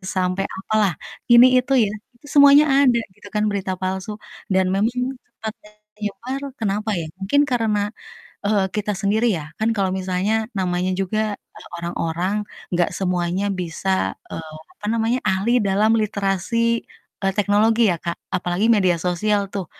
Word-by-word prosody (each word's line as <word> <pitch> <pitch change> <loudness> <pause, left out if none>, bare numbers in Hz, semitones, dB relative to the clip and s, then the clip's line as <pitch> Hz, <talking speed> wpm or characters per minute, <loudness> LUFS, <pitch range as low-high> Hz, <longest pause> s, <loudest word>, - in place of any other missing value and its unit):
sampai 185 +1 0
apalah 210 0 +1 0.4
ini 240 +1 +9
itu 255 +2 -5 0.2
ya, - - -4 0.2
itu 245 +5 -18
semuanya 285 +1 +8 0.2
ada 245 -3 +4 0.2
gitu - - -14
kan 210 - +2
berita 195 -2 -2
palsu 190 +2 -3 0.4
dan 190 0 +3
memang 210 +4 +2 0.5
cepat 220 -1 -5 0.4
menyebar 220 +6 -5 0.2
kenapa 210 0 -1
ya 160 - -4
mungkin 205 +9 +2
karena, 225 -4 +1 0.7
eee, 205 -1 +2
kita 210 0 -1
sendiri 215 +4 +2
ya 155 - -6 0.2
kan 220 +1 +2
kalau 195 -3 0
misalnya 185 +3 -1 0.3
namanya 180 0 0
juga, 195 +3 -1 0.4
eee, - - -12
orang-orang 170 +2 -2 0.4
gak 175 - +2
semuanya 180 0 -1
bisa, 175 +2 -4 0.4
eee, 160 -1 -7 0.3
apa 210 - -8
namanya, 230 +2 +1
ahli 195 +3 +1 0.2
dalam 205 +3 +3
literasi, 200 0 -1 0.6
eee, 195 -1 +1
teknologi 210 +3 +3
ya, - - 0
Kak, 170 0 -2 0.2
apalagi 180 +3 0
media 185 -4 +3
sosial 205 +4 +1
tuh 195 -2 -3
200 Hz, 145 wpm, -21 LUFS, 185-220 Hz, 0.7 s, ini